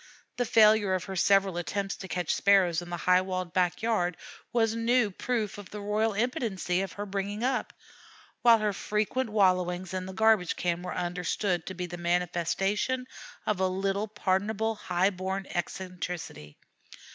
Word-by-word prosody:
The 245 - +1
failure 215 -3 +5
of 185 - -2
her 190 - -6
several 195 -1 +3
attempts 195 +4 -2
to 190 - -8
catch 175 0 -1
Sparrows 185 -4 +3
in 175 - -9
the 175 - -3
high 180 0 +5
walled 185 -2 -4
back 180 +1 +1
yard 180 -7 +1 0.3
was 225 -2 +2
new 230 -1 +2
proof 215 0 -2
of 200 - -10
the 210 - -7
royal 210 +2 0
impotency 205 -5 -1
of 195 - -4
her 205 - -5
bringing 200 +2 -3
up; 255 0 0 0.7
while 235 -1 +7
her 210 -2 0
frequent 215 +5 -1
wallowings 185 -3 +1
in 185 0 -3
the 190 - -7
garbage 220 -3 +3
can 175 -1 -1
were 180 0 -5
understood 180 0 -1
to 190 - -5
be 180 0 -3
the 175 0 -7
manifestation 180 +8 0 0.4
of 210 -3 0
a 190 - +3
little 195 +3 -1
pardonable 210 +2 0
high 185 -2 0
born 190 +1 -3
eccentricity. 175 - -5
195 Hz, 165 wpm, -28 LUFS, 180-215 Hz, 0.7 s, while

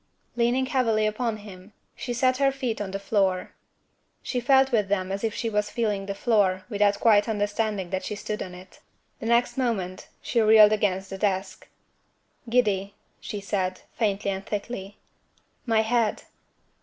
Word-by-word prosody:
Leaning 240 +2 +2
heavily 230 -5 +1
upon 215 +1 -1
him, 205 -1 -12 0.2
she 245 - -5
set 255 +2 +2
her 275 0 +3
feet 255 -5 -3
on 200 - -3
the 195 - -3
floor. 195 -2 0 0.7
She 250 - -2
felt 265 +1 +4
with 215 -4 +2
them 190 -1 -1
as 195 +2 -3
if 225 -2 -1
she 230 - -2
was 210 -1 0
feeling 210 -4 -1
the 200 - -3
floor, 195 -4 +2
without 205 -1 +2
quite 215 -1 +4
understanding 205 -2 -1
that 190 -1 -2
she 210 - -4
stood 210 +1 -5
on 180 -1 -6
it. 185 +1 -14 0.4
The 225 - -5
next 240 +2 +2
moment, 195 -8 -2
she 235 - 0
reeled 215 -1 +7
against 195 -3 0
the 195 - -6
desk. 190 -2 -2 0.8
"Giddy," 205 -5 +1 0.2
she 210 - -6
said, 185 -2 -2
faintly 200 -3 0
and 190 0 -4
thickly. 205 -1 -5 0.7
"My 225 -1 +3
head." 225 -1 0
210 Hz, 165 wpm, -26 LUFS, 195-235 Hz, 0.8 s, reeled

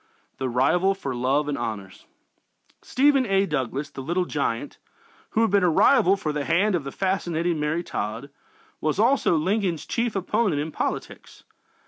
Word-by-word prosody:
THE 130 -1 -1
RIVAL 175 +11 +2
FOR 140 -9 -5
LOVE 135 +4 +1
AND 145 -1 -2
HONORS 100 -4 -6 0.7
Stephen 275 0 +3
A. 195 0 +2
Douglas, 140 -2 -3
"the 135 - -7
Little 175 +6 -1
Giant," 140 -8 -3 0.6
who - - +5
had 225 - +1
been 200 -2 +3
a 180 - +4
rival 180 +4 +4
for 155 -5 -3
the 145 -1 -2
hand 185 +7 +2
of 170 -5 0
the 135 - -6
fascinating 175 -3 -1
Mary 150 +3 -1
Todd, 115 +2 -5 0.5
was 155 +1 -1
also 235 -3 +3
Lincoln's 180 0 0
chief 235 -2 -2
opponent 195 -3 0
in 155 +2 -3
politics. - - -5
165 Hz, 160 wpm, -24 LUFS, 140-195 Hz, 0.7 s, who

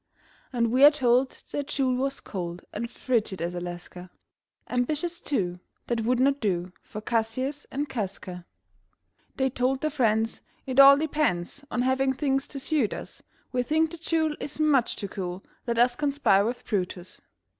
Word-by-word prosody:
And 235 -3 +1
we 260 +3 +4
are 290 - +12
told 260 -3 +1
that 285 -1 -3
Jule 270 -3 +1
was 270 +2 -2
cold 175 -3 -6
And 235 +3 -3
frigid 225 -7 -1
as 170 +1 -2
Alaska, 175 +1 -7 0.6
Ambitious, 310 +8 -1
too, 180 -10 -1 0.3
that 235 -1 -1
would 245 +2 +1
not 275 +2 +3
do 180 -5 -1
For 215 - -8
Cassius 240 +6 -1
and 285 +2 -2
Casca. 185 -6 -5 0.9
They 265 -1 +1
told 260 +1 0
their 310 - 0
friends: 225 -5 +1 0.2
"It 260 -1 0
all 275 0 +10
depends 285 - -1
On 245 - 0
having 265 +1 +2
things 270 0 0
to 275 - -6
suit 275 -5 +1
us. - - -8 0.3
We 250 -1 +1
think 315 +5 +1
that 340 -2 -9
Jule 320 -2 +1
is 295 - -5
much 290 -6 +3
too 200 - -4
cool; 185 -1 -5 0.2
Let 235 -1 0
us 240 +1 +4
conspire 280 -9 +3
with 240 +2 -3
Brutus." 185 -3 -3
250 Hz, 165 wpm, -27 LUFS, 210-280 Hz, 0.9 s, are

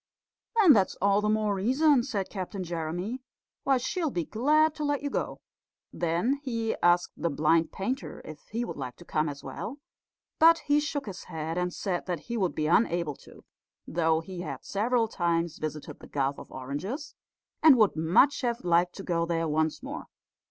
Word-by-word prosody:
"Then 370 -9 +8
that's 195 -4 +2
all 200 +1 +2
the 210 - 0
more 215 -1 +1
reason," 260 +8 +3
said 200 -5 -3
Captain 190 0 -4
Jeremy, 175 +8 -4 0.4
"why 270 -1 +3
she'll 320 +6 -1
be 175 - -2
glad 300 - +3
to 305 - -5
let 290 -1 0
you 285 - -2
go." - - -3 0.5
Then 175 +12 0
he 230 -5 -2
asked 175 0 +3
the 170 - -1
blind 160 +2 +2
painter 250 +8 -4
if 155 -1 -11
he 235 +3 -2
would - - -6
like 125 - -5
to 175 - -15
come 155 -1 0
as 140 -1 -8
well, 265 - -6 0.6
but 330 +1 +7
he 290 0 +4
shook 295 -1 -3
his 195 -3 -8
head 160 -1 -4
and 180 0 -1
said 180 0 -3
that 175 -4 -2
he 235 - -5
would 190 -6 0
be 155 - -1
unable 170 -2 +2
to, - - -16 0.4
though 160 -1 +1
he 180 +2 -8
had - - -6
several 225 +3 +1
times 170 -5 -1
visited 155 -1 -5
the - - -12
Gulf 140 0 -1
of - - -12
Oranges, 170 - -5 0.5
and 310 -5 +8
would 215 -3 +4
much 170 - +4
have 240 -2 -1
liked 175 0 +2
to 195 - -7
go 170 -2 0
there 165 -1 0
once 155 0 0
more. - - -6
190 Hz, 185 wpm, -28 LUFS, 165-250 Hz, 0.6 s, Then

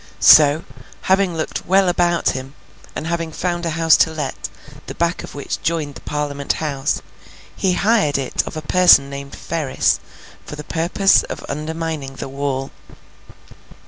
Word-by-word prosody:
So, 150 +1 +7 0.4
having 190 -2 +1
looked 155 - -4
well 190 +1 +4
about 175 -1 +2
him, 135 +2 -5 0.4
and - - -4
having 165 -1 -2
found 175 +1 -2
a 160 -1 -3
house 165 -1 +5
to - - +3
let, 155 -1 -5 0.4
the - - -7
back 170 +1 -1
of - - -10
which 140 - -5
joined 155 -3 -2
the - - -12
Parliament 145 -1 -2
House, 145 -3 -2 0.5
he 190 -2 +1
hired 200 -8 +2
it 135 -2 -1
of - - -6
a 155 - -5
person 160 -4 +5
named 140 0 -7
Ferris, 155 -5 0 0.4
for - - -8
the 150 - -8
purpose 170 +6 +2
of - - -7
undermining 155 -2 -4
the 135 - -6
wall. 135 -1 -3
155 Hz, 155 wpm, -19 LUFS, 140-170 Hz, 0.5 s, So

